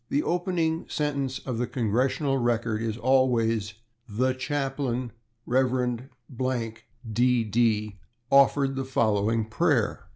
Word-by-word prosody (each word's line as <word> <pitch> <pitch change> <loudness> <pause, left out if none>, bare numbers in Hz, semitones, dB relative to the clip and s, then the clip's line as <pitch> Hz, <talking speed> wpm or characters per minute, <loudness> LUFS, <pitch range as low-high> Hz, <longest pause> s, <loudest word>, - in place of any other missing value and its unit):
The 145 - +1
opening 170 -2 -1
sentence 140 -4 -1
of 125 -4 -5
the 125 - 0
/Congressional 130 +3 0
Record/ 115 -2 0
is 115 -1 -2
always: 115 -5 +2 0.3
"The 130 +5 +1
Chaplain, 135 -2 -2 0.4
/Rev./, 125 -2 -1 0.4
D.D., 115 -3 +1 0.3
offered 140 0 +4
the 135 - -2
following 110 -3 +1
prayer." 110 - 0
125 Hz, 100 wpm, -26 LUFS, 115-135 Hz, 0.4 s, offered